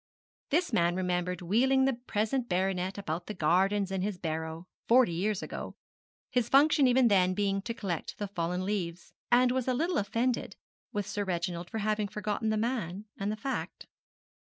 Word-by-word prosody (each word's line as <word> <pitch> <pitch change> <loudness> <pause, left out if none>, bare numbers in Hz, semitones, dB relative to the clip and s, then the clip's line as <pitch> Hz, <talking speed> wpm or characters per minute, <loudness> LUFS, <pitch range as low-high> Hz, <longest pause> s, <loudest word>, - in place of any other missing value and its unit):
This 330 -2 +1
man 175 -4 +3
remembered 180 0 -1
wheeling 265 +8 +3
the 270 - +2
present 235 +1 -2
baronet 185 +1 0
about 170 -3 -4
the 210 - -5
gardens 190 +5 +2
in 190 -1 -1
his 200 -1 -2
barrow, 160 0 -4 0.2
forty 240 -4 +5
years 195 +4 -1
ago - - -6 0.6
his 245 -2 +1
function 285 0 +5
even 250 0 +5
then 185 -3 +3
being 195 -1 0
to 230 +4 -4
collect 180 -8 -4
the 205 - -3
fallen 180 -1 -2
leaves 180 -4 -3 0.2
and 245 +1 +5
was 260 -1 -1
a 255 - +2
little 330 +5 +1
offended 230 +5 -1 0.4
with 205 -1 -2
Sir 205 0 -2
Reginald 175 -2 -3
for 225 - -4
having 215 0 0
forgotten 210 +1 -2
the 215 - +1
man 215 -4 -2
and 200 +1 -1
the - - -2
fact. 265 +4 -4
205 Hz, 175 wpm, -30 LUFS, 180-235 Hz, 0.6 s, forty